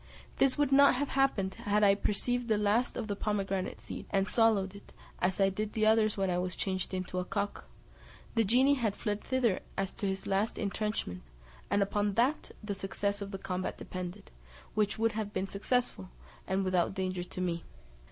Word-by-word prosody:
This 275 +1 +3
would 290 -2 +2
not 280 0 +7
have 280 +2 -1
happened, 240 -9 +1
had 210 -2 +1
I 200 -1 +7
perceived 240 +4 0
the 215 -2 +3
last 210 +4 +1
of - - -2
the 205 - -2
pomegranate 195 -2 -2
seeds, - - -8
and 195 0 +1
swallowed 215 -5 +3
it, 200 - -13 0.3
as 180 +2 0
I 195 -1 +5
did 210 +2 -3
the 215 -1 +2
others 215 -1 +4
when 195 -1 +1
I 175 - +1
was 180 0 -2
changed 185 -2 -2
into 185 0 -3
a - - -1
cock: 200 +3 -3 0.7
the 230 - +3
genie 255 +7 +4
had 230 -7 0
fled 210 -1 -2
thither 250 -7 +1 0.2
as 195 -1 -1
to 200 - -3
his 190 0 -3
last 200 +3 0
intrenchment, 205 - -2 0.5
and 200 0 +3
upon 205 0 0
that 255 +6 +2
the 210 -1 -2
success 200 +1 -2
of 200 - -4
the 195 - -5
combat 185 -1 -3
depended, 180 -1 -7 0.4
which 210 0 +1
would 225 0 +2
have 215 -1 -4
been 190 - -1
successful, 200 - -1 0.4
and 190 +1 0
without 185 0 +1
danger 185 -2 -2
to 180 - -8
me. 175 -2 -1
205 Hz, 190 wpm, -31 LUFS, 190-225 Hz, 0.7 s, not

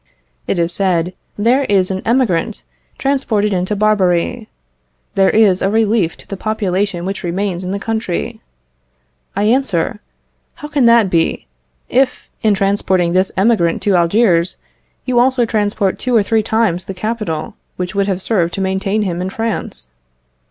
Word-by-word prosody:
It - - 0
is 170 0 0
said, 180 -2 0 0.2
"There 240 +6 +3
is 195 -4 +2
an 190 0 -3
emigrant 225 -5 +1 0.3
transported 225 -7 0
into 185 +3 -1
Barbary; 210 +1 +1 0.7
this 195 -2 +3
is 205 -4 +4
a 195 - +2
relief 215 -4 +1
to - - -16
the 195 - -5
population 195 -3 -1
which 195 +1 -4
remains 185 +1 -2
in 180 - -4
the 200 - -2
country," 220 -3 -3 0.9
I 200 - 0
answer, 215 -4 +1 0.6
"How 295 - -9
can 285 -4 +2
that 230 -5 +5
be, 165 -1 0 0.4
if, 255 +1 +1
in 215 -2 +3
transporting 190 -3 +1
this 185 +1 +2
emigrant 190 -5 +2
to 200 -2 +2
Algiers, 175 0 +2 0.5
you 250 -2 +2
also 250 -1 +3
transport 205 -3 0
two 250 -1 0
or 215 - +5
three 225 +1 +1
times 215 -5 0
the 195 - -6
capital 210 -6 -3 0.2
which 180 +1 -4
would 200 0 0
have 190 -1 -2
served 175 -6 +1
to - - -4
maintain 195 +2 0
him 180 -3 -2
in 185 - -2
France?" 225 - -4
200 Hz, 155 wpm, -17 LUFS, 180-225 Hz, 0.9 s, that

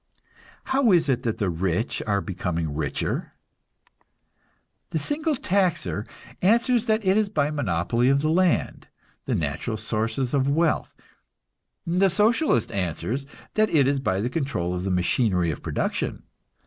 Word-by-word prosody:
How 265 -4 +2
is 170 -5 +4
it 125 -2 +1
that 115 -4 -2
the 100 -4 0
rich 90 +6 -1
are 100 -1 +1
becoming 85 -6 -3
richer? 75 -2 -3 1.6
The - - -2
single 295 - 0
taxer 175 - 0 0.3
answers 235 +4 +3
that 220 -2 +1
it 190 +2 +4
is 215 -2 +2
by 150 -7 0
monopoly 120 - +1
of 140 +1 +3
the 155 - +1
land, 180 0 +1 0.4
the - - 0
natural 80 +9 -2
sources 115 +4 -2
of 140 -1 +2
wealth; 160 +2 +1 0.9
the 180 +3 +3
Socialist 210 - +2
answers 100 - -3 0.3
that 215 0 +3
it 145 -4 +4
is 140 +1 +1
by 95 -7 0
the 120 - -1
control 125 - -2
of 90 +1 -3
the - - -1
machinery 90 -1 +1
of 70 - -7
production. - - -2
135 Hz, 145 wpm, -25 LUFS, -, 1.6 s, is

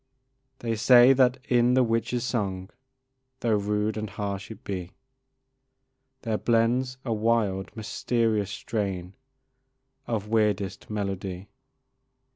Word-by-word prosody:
They 115 -2 -2
say 125 +3 +7
that 130 -1 +3
in 125 0 +3
the 130 - +5
witch's 115 +1 0
song, 95 -7 -2 0.7
Though 110 -3 +2
rude 105 +1 -1
and 110 -1 -3
harsh 100 -1 -4
it 110 -3 -10
be, 90 -2 -5 1.3
There 110 -2 -1
blends 120 +3 +1
a 115 - 0
wild, 105 -3 +1
mysterious 110 -2 0
strain 100 -4 -3 0.9
Of 110 -3 -2
weirdest 105 -4 0
melody. 100 -2 -4
110 Hz, 105 wpm, -26 LUFS, 100-115 Hz, 1.3 s, say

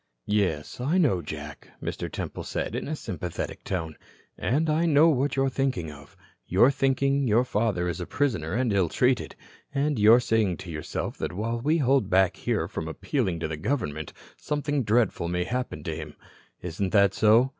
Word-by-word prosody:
"Yes, 95 -7 -1
I 150 +8 +1
know, 135 - +3
Jack," 75 -1 -8
Mr. - - -4
Temple - - -5
said - - -3
in - - -3
a 155 - -2
sympathetic 90 - -5
tone, 80 -5 -3 0.4
"and 150 +7 0
I 160 +2 +2
know 155 +1 +6
what 140 -2 +1
you're 135 0 +2
thinking 130 - -1
of. 70 -1 -15 0.3
You're 110 +9 +5
thinking 135 0 +1
your 115 +2 +4
father 105 -7 0
is 85 -1 -3
a 90 - -5
prisoner 110 - -1
and 120 -3 +1
ill 95 -4 +2
treated. 125 +5 +1 0.4
And 140 -2 +1
you're 110 +3 +7
saying 110 -7 +1
to 90 - -8
yourself 75 -1 -4
that - - -3
while 115 +5 -2
we 155 +6 +2
hold 135 - +2
back 95 -1 +3
here - - -1
from 80 - -5
appealing 90 - -2
to 80 - -1
the 80 -1 -4
government, 75 - -2 0.3
something 145 -1 -1
dreadful 110 -6 +1
may 90 +1 0
happen 125 +6 -3
to 80 -4 -3
him. 75 -2 -8 0.5
Isn't 90 +2 -3
that 100 -2 +5
so?" 110 +4 +5
110 Hz, 180 wpm, -26 LUFS, 85-135 Hz, 0.5 s, you're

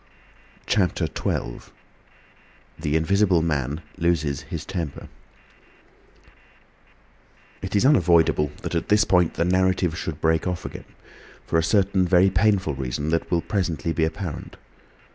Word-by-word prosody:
CHAPTER 100 -4 +1
XII. - - -4 1.1
THE 75 -1 -1
INVISIBLE 90 +1 +2
MAN 75 -1 -1 0.2
LOSES 80 -5 0
HIS - - -5
TEMPER 85 -7 -5 2.5
It 95 +1 -4
is 100 - +3
unavoidable 85 - +4
that - - -4
at - - -2
this 105 0 +5
point 90 -5 +2
the 85 - 0
narrative 90 -2 +1
should 80 -2 -5
break 80 +2 +1
off 90 -1 -3
again, - - -8 0.6
for 80 - +1
a - - 0
certain 95 0 +2
very 95 +2 +4
painful 95 -4 +2
reason 65 +3 -3
that 80 0 -1
will 85 -1 +1
presently 85 -7 -2
be 80 - 0
apparent. 80 0 -4
85 Hz, 125 wpm, -24 LUFS, 80-95 Hz, 2.5 s, this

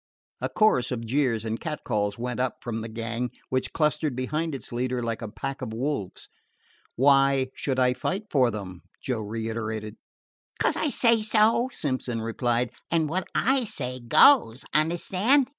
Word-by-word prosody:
A - - -1
chorus 130 - +3
of 115 -2 -3
jeers 120 -3 0
and 110 +1 -2
catcalls 105 -10 -2
went 125 +1 -4
up 130 0 0
from 115 -2 -3
the 115 - -6
gang, 115 +2 -3 0.2
which 130 0 -1
clustered 150 -2 0
behind 150 +5 -2
its 135 - -8
leader 125 0 -1
like 115 -1 -3
a 115 - -4
pack 115 +6 -5
of 115 -4 -5
wolves. 125 -5 -3 0.7
"Why 135 0 +4
should 135 -2 -2
I 125 -1 +3
fight 190 - -2
for 130 -4 +4
them?" 95 -5 -7 0.2
Joe 125 -4 -2
reiterated. 110 0 -4 0.6
"'Cos - - +2
I - - 0
say 230 -4 +3
so," 220 +3 +3
Simpson 130 - -2
replied. 120 +2 -1 0.2
"An' 165 -1 +2
wot 175 +5 -2
I 265 +1 +3
say 130 - -3
goes. 125 - +5
Understand?" 185 - +2
125 Hz, 160 wpm, -26 LUFS, 115-155 Hz, 0.7 s, goes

